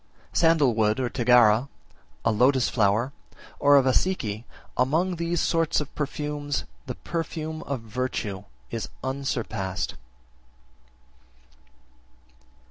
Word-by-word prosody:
55. - - -22
Sandal 165 -6 +4
wood 110 +1 +2
or 125 -2 0
Tagara, 120 0 +4 0.6
a 115 - +4
lotus 125 +4 +3
flower, 110 +4 +2 0.5
or 145 0 +6
a 135 - +5
Vassiki, 125 - 0 0.3
among 165 +8 +1
these 170 0 -1
sorts 165 -1 +2
of 150 -2 -6
perfumes, 145 0 -3 0.2
the - - -4
perfume 160 -1 -4
of 140 -4 -2
virtue 110 -4 -3 0.3
is - - -4
unsurpassed. 115 -8 -2
130 Hz, 105 wpm, -26 LUFS, 115-150 Hz, 0.6 s, or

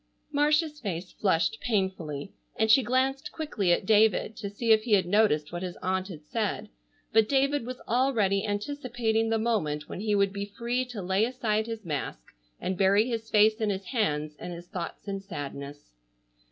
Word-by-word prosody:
Marcia's 300 +1 +2
face 180 - -4
flushed 190 +2 +1
painfully, 190 - -2 0.2
and 220 0 +3
she 270 - +7
glanced 265 +6 0
quickly 230 - -1
at 175 - +2
David 215 +1 +3
to 205 -2 -4
see 225 +3 0
if 220 -1 +6
he 220 -1 -1
had 190 -3 +5
noticed 175 -6 +2
what 175 0 -4
his 180 -2 -5
aunt 185 0 0
had 155 -6 -10
said, 210 +2 -2 0.4
but 220 -1 +4
David 275 -2 +2
was 255 0 -6
already 220 -6 +1
anticipating 225 0 -1
the 225 - +2
moment 190 -10 -1
when - - -6
he 210 0 +1
would 200 -1 +2
be 200 0 -5
free 240 +2 0
to 240 -6 -7
lay 190 +3 +2
aside 225 -3 0
his 225 -3 -6
mask 140 - -4 0.4
and 185 0 -3
bury 200 +3 +4
his 225 -2 -3
face 215 +1 +4
in 215 - +1
his 195 -1 -3
hands 155 - -1
and 180 - -6
his 170 +1 -9
thoughts 180 +3 -6
in 195 -1 -2
sadness. 145 - -7
210 Hz, 180 wpm, -28 LUFS, 185-235 Hz, 0.4 s, she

